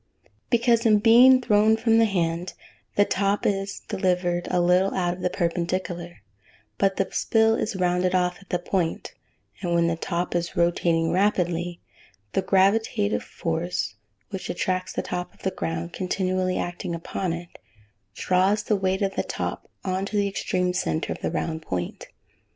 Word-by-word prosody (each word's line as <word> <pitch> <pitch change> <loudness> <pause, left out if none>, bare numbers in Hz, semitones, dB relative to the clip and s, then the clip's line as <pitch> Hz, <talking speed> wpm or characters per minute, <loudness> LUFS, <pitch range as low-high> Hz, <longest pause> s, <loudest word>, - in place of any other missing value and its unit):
"] - - -39
Because, 235 -1 +3
in 215 -3 +5
being 245 +4 +7
thrown 220 -1 +4
from 225 0 +3
the 225 - +5
hand, 175 -3 -1 0.4
the 205 - +5
top 200 +1 0
is 195 0 -1
delivered 180 -3 -1
a 180 - +1
little 180 +2 +3
out 175 -2 0
of 180 - -10
the 180 - +1
perpendicular, 175 - -3 0.6
but 195 -1 +2
the 195 - 0
spill 225 0 +3
is 220 -1 -2
rounded 180 0 +1
off 180 -1 +1
at 190 - -19
the 180 - +1
point, 175 -1 -2 0.5
and 175 -2 0
when 170 0 +3
the 170 0 +1
top 175 +1 -3
is 175 0 -2
rotating 170 -1 +2
rapidly, 175 -3 0 0.5
the 195 - +2
gravitative 205 +2 +2
force 165 -5 -3 0.4
which 190 -2 -5
attracts 185 +1 -1
the - - -3
top 180 0 -5
to - - -21
the 190 - 0
ground 85 0 -3
continually 185 0 -1
acting 175 -1 -3
upon 170 +2 -3
it, 170 +1 -7 0.6
draws 190 +3 +2
the 215 - +1
weight 190 0 0
of 195 0 0
the - - 0
top - - -4 0.2
on 190 0 -1
to 210 - -2
the 200 0 +2
extreme 180 -2 -1
centre 170 -3 -1
of - - -12
the - - -1
round 160 -1 -3
point. 90 - -4
185 Hz, 170 wpm, -25 LUFS, 175-200 Hz, 0.6 s, being